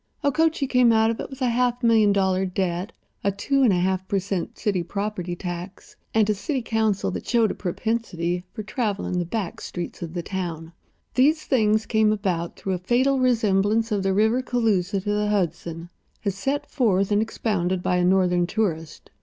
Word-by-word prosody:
Okochee 310 +1 +2
came 250 -2 +4
out 220 0 +4
of 230 - -5
it - - -5
with 265 -1 -6
a 250 - +3
half 245 +1 0
million 220 -3 +5
dollar 190 -1 +2
debt, 185 +1 -2 0.3
a 200 - +2
two 275 +8 0
and 250 -5 +5
a - - +3
half 185 +1 0
per 200 - 0
cent. 190 -2 -3
city 200 -5 0
property 190 -1 -3
tax, 175 +2 -7 0.2
and 220 -2 +3
a 215 - +3
city 260 - -3
council 220 -3 0
that - - -6
showed 230 -3 +3
a - - -3
propensity 180 -3 -2
for 215 - -6
traveling 205 -4 -2
the 175 - -1
back 195 0 -4
streets 175 -1 -6
of 170 0 -6
the 175 - -2
town. 170 -4 -5 0.4
These 305 +5 +3
things 220 -4 +2
came 220 -1 +3
about 185 -5 -2
through 190 - -3
a - - 0
fatal 255 +8 +2
resemblance 225 -2 +2
of 205 -2 +1
the 195 0 +1
river 220 +6 +2
Cooloosa 205 -7 0
to 205 0 -1
the 210 0 0
Hudson, 170 -4 -2 0.4
as 200 - +1
set 270 +9 -2
forth 200 -7 +2
and 205 +1 +3
expounded 190 -5 -1
by 180 - +1
a 180 - +2
Northern 180 -1 +3
tourist. 170 -6 -3
205 Hz, 190 wpm, -24 LUFS, 180-230 Hz, 0.4 s, million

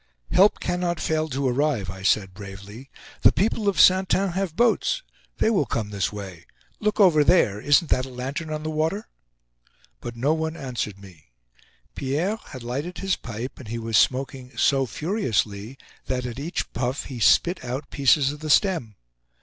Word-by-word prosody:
"Help 200 +3 +5
cannot 175 -1 -1
fail 155 0 -1
to 135 0 -1
arrive," 125 -7 0
I 95 0 -10
said, 95 -1 +1
bravely. 100 +5 -10 0.3
"The - - +7
people 210 +1 +1
of 200 - -2
Saintin 190 +1 +5
have 185 -2 -2
boats; 240 - +2 0.3
they 220 - +2
will 185 - +1
come 105 -3 -3
this 100 -3 -1
way. 95 -5 -9 0.3
Look 210 0 -1
over 170 -7 +6
there! 105 - +3
Isn't 145 +4 +3
that 130 +1 +2
a - - -10
lantern 135 +6 -5
on 155 0 -4
the 155 - -3
water?" 160 +7 -1 0.9
But 120 - -7
no 135 +6 +1
one 160 +1 -3
answered 120 -7 -4
me. 95 -6 -15 0.7
Pierre 155 +11 -1
had 130 -5 -9
lighted 140 +9 -4
his 195 -1 0
pipe, 115 +3 -7
and 130 - -10
he 115 +2 -4
was 115 -1 -3
smoking 130 +1 +1
so 135 -2 +3
furiously 115 - -2 0.3
that, 125 -1 -2
at 125 +1 -5
each 160 +5 -4
puff, 125 +3 -2
he 125 -3 -7
spit 175 - +3
out 130 +4 -5
pieces 140 0 +3
of 150 - -9
the 155 0 -6
stem. 150 - +2
135 Hz, 175 wpm, -24 LUFS, 115-170 Hz, 0.9 s, The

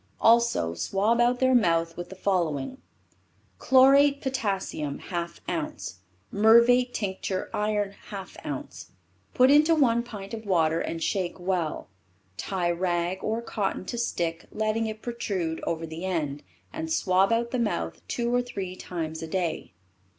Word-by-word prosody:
Also 230 - +4
swab 205 - +1
out 245 +1 +3
their 260 0 +3
mouth 165 -7 +2
with 175 - -7
the 190 - -9
following: 180 - -1 0.8
"Chlorate 275 +2 +5
potassium 195 - -2
half 170 -1 -5
ounce, 90 - -4 0.3
murvate 235 +4 +5
tincture 190 -3 -3
iron 210 -1 0 0.2
half 195 -3 -8
ounce. 140 -3 -7 0.4
Put 255 +2 +6
into 310 +3 +6
one 235 -6 +3
pint 210 -4 -9
of 225 -1 -5
water 165 -3 +2
and 165 -1 -3
shake 185 -2 -1
well. 175 -3 -2 0.5
Tie 175 - -1
rag 175 +1 -1
or 225 +2 -1
cotton 205 -4 -2
to 240 - -4
stick, 170 -7 -2
letting 220 +1 0
it 215 0 -7
protrude 190 -9 -3
over 165 0 -2
the 160 +2 -7
end, 155 -6 -2 0.3
and 320 +1 -4
swab 190 - +3
out 235 +1 +1
the 255 - -1
mouth 85 - -2
two 240 0 -1
or 245 - +3
three 195 -7 -5
times 160 -4 -5
a 160 - -5
day." 175 -1 -2
195 Hz, 145 wpm, -27 LUFS, 170-235 Hz, 0.8 s, Put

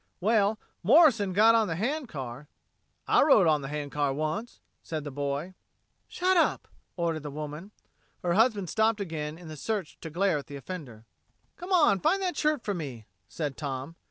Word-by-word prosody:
"Well, 210 +1 +2 0.2
Morrison 225 - +5
got 215 +4 +6
on 225 -2 +3
the 165 - -2
hand 265 - -2
car." 135 0 -7 0.6
"I - - +5
rode 270 - +6
on 155 -2 +3
the 135 - -5
hand 145 0 -4
car 145 -2 0
once," 155 - -3 0.2
said 155 -2 -5
the 145 - -6
boy. 145 +5 -3 0.5
"Shut 370 +1 +1
up!" 335 - +2 0.3
ordered 165 -2 -1
the 150 - -6
woman. 150 +5 -7 0.5
Her 175 -1 +1
husband 210 -2 +3
stopped 220 +3 +1
again 160 -5 -4
in 175 -1 -12
the 155 - -7
search 195 +2 -4
to 165 - -6
glare 175 0 +1
at 140 - -11
the 145 - -8
offender. 135 -8 -8 0.5
"Come 355 +2 -9
on, 295 - +5
find 340 - +2
that 370 -2 -2
shirt 300 -4 0
for 205 - -1
me," 135 - -6 0.2
said 150 -4 -4
Tom. 140 +1 -5
170 Hz, 185 wpm, -28 LUFS, 150-220 Hz, 0.6 s, got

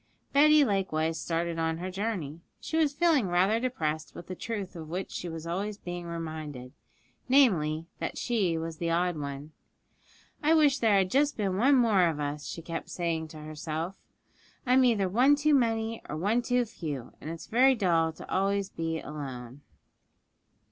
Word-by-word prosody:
Betty 300 +1 +6
likewise 165 -6 0
started 170 0 -2
on 160 0 0
her 185 +2 -5
journey. 180 -6 -3 0.2
She - - -5
was 315 -3 +3
feeling 290 - +2
rather 185 +5 +2
depressed 160 -12 -2
with 175 - -9
the 185 - -6
truth 200 -1 -5
of 160 -2 -8
which 180 +3 -4
she 175 - -5
was 165 0 -7
always 200 +5 -3
being 175 -3 -6
reminded 155 -6 -6 0.6
namely, 165 - +3
that - - -4
she 200 -9 0
was 160 0 -5
the 170 +1 -2
odd 175 +1 +1
one. 140 0 -6 0.9
'I 310 +2 +4
wish 290 -4 +4
there 220 -4 +4
had 190 -1 +1
just 285 +3 +2
been 195 -4 0
one 265 +7 +5
more 215 -8 +4
of 160 -3 -2
us,' 145 0 -3
she 165 - -6
kept 165 0 -5
saying 165 -2 -2
to 155 - -12
herself; 155 +3 -4 0.7
'I'm 255 +1 +5
either 215 -6 +3
one 250 +10 +4
too 300 +1 +2
many 225 -3 +1
or 150 - -3
one 210 +8 +1
too 245 0 +1
few, 150 - -6
and 155 - -6
it's 165 0 -7
very 260 +3 +4
dull 170 -6 +2
to - - -11
be - - -13
always 195 +1 0 0.3
alone.' 135 -3 -7
180 Hz, 175 wpm, -29 LUFS, 160-230 Hz, 0.9 s, Betty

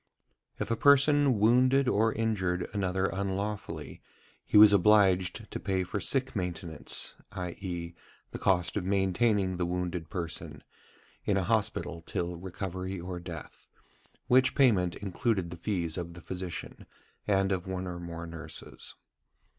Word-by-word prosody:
If - - -3
a - - +3
person 140 0 +5
wounded 125 +5 +4
or 110 -1 +3
injured 95 -6 -1
another 95 -2 0
unlawfully, 95 -4 -3 0.4
he - - +2
was 105 -1 +9
obliged 95 -2 +3
to - - -4
pay 95 -1 0
for 95 +3 -3
"sick 130 +4 -1
maintenance," 85 -4 -3 0.2
i.e., 90 -2 -5 0.4
the - - -6
cost 90 -3 +1
of 105 - -1
maintaining 95 0 +1
the 90 - 0
wounded 90 -2 -3
person 85 -3 -5 0.6
in 100 - +1
a 95 - +1
hospital 90 -5 -1
till 85 +1 -3
recovery 95 +1 -5
or 90 +1 -5
death; 85 -3 -9 0.6
which 130 +1 +4
payment 100 -10 +4
included 100 -2 -1
the - - -5
fees 85 -3 -2
of 85 -1 -6
the 85 - -10
physician 90 -1 -6 0.4
and 95 -1 +2
of 95 -1 -2
one 95 0 -3
or 90 -1 -5
more 85 -1 -6
nurses. 80 -1 -7
95 Hz, 140 wpm, -30 LUFS, 90-105 Hz, 0.6 s, was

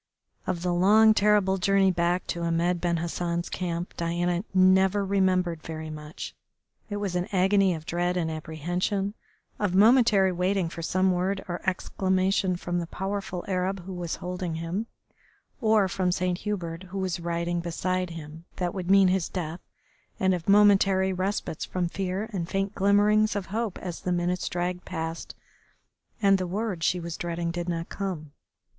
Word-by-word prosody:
Of 175 -2 -2
the 180 -1 +1
long, 215 +5 +6
terrible 205 -2 +3
journey 195 0 +3
back 175 +1 0
to 170 - -3
Ahmed 170 +1 0
Ben 170 -1 +1
Hassan's 170 +1 -2
camp 175 -1 -3
Diana 175 +1 0
never 190 +1 +4
remembered 185 -4 +1
very 160 -1 -6
much. 150 0 -7 0.6
It 205 - -3
was 200 -3 -2
an 180 +1 0
agony 195 -1 +3
of 160 -1 -9
dread 175 +2 0
and 165 -2 -1
apprehension, 175 +6 -2 0.5
of 200 -3 0
momentary 215 -2 +5
waiting 180 0 0
for 165 - -7
some 185 +3 +2
word 185 +2 -1
or 175 -1 -4
exclamation 190 0 0
from 175 0 -2
the 170 - -4
powerful 190 -1 -4
Arab 190 0 -1
who 190 - -6
was 175 -2 -3
holding 180 -2 -4
him, 170 +7 -3 0.7
or 215 -3 +4
from 185 0 0
Saint 180 0 -1
Hubert, 175 -5 -4
who 195 - -6
was 185 -2 -1
riding 170 0 -1
beside 180 +2 -2
him, 160 0 -9
that 175 -1 -2
would 185 -2 -4
mean 195 -1 +6
his 185 -2 0
death, 170 -2 -4 0.6
and 190 0 +3
of 175 +1 -3
momentary 195 -2 +5
respites 185 -3 -2
from 180 -1 -2
fear 190 +3 -3
and 175 -3 -3
faint 195 +1 -1
glimmerings 210 +2 +3
of 200 -2 -2
hope 225 -4 -2
as 175 -3 -6
the 180 - -2
minutes 175 +1 0
dragged 180 0 -2
past 165 -2 -5 0.9
and 195 -1 +5
the 185 - -2
word 195 -2 -3
she 180 - +2
was 170 -1 -5
dreading 170 -1 -2
did 175 +1 -4
not 165 -1 -3
come. 175 -7 -4
180 Hz, 165 wpm, -27 LUFS, 170-195 Hz, 0.9 s, long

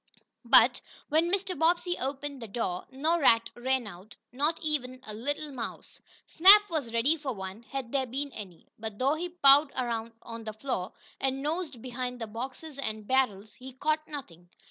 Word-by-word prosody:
But, - - +6 0.3
when 325 +3 +2
Mr. 380 -1 -1
Bobbsey 345 +2 +2
opened 275 0 -4
the 230 - -6
door, 195 -4 -3
no 310 +6 0
rat 230 -5 +4
ran 260 0 -1
out, 195 0 -11 0.2
not 295 +6 0
even 255 -5 -2
a 215 - -7
little 290 +7 -3
mouse. 235 -3 -7 0.2
Snap 395 +5 +8
was 290 -8 -2
ready 235 +7 +2
for 285 -4 -4
one, 190 +2 -7
had 265 -4 -5
there 265 -2 0
been 275 +4 -4
any; 190 -8 -10
but 220 -2 -6
though 270 +4 +2
he 345 +3 -3
pawed 285 -3 +6
around 230 -2 -3
on 230 -1 -8
the 215 - -5
floor, 215 -5 -4 0.3
and 270 0 -1
nosed 300 -5 -3
behind 250 0 -4
the 225 - -3
boxes 265 +7 -7
and 215 -5 -4
barrels, 215 -6 +1
he 255 +3 -11
caught 310 +4 -1
nothing. 175 - -9
260 Hz, 175 wpm, -29 LUFS, 230-300 Hz, 0.3 s, Snap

